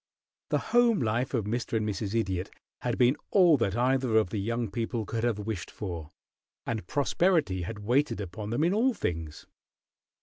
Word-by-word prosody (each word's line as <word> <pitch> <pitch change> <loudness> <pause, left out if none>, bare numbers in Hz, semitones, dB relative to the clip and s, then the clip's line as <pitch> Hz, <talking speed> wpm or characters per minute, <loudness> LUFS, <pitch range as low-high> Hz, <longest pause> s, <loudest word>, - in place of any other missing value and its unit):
The - - +2 0.2
home 240 -2 +5
life 120 +2 0
of 110 -4 0
"Mr. 115 +3 -3
and 110 -1 -1
Mrs. 105 +1 -3
Idiot" 95 -4 -2 0.3
had - - -2
been 125 +3 +4
all 180 -6 +6
that 100 -3 0
either 125 -2 +2
of 105 -5 +2
the 105 - -2
young 115 +1 -2
people 115 +1 -2
could 115 +2 -3
have 120 -3 +1
wished 105 -3 -4
for, 85 -7 -6 0.6
and 110 -2 -3
prosperity 150 - +1
had 105 +3 -6
waited 130 0 +2
upon 100 +2 -5
them 120 +7 0
in 175 +3 +3
all 240 +4 +2
things. 80 - -4
115 Hz, 175 wpm, -28 LUFS, 100-130 Hz, 0.6 s, all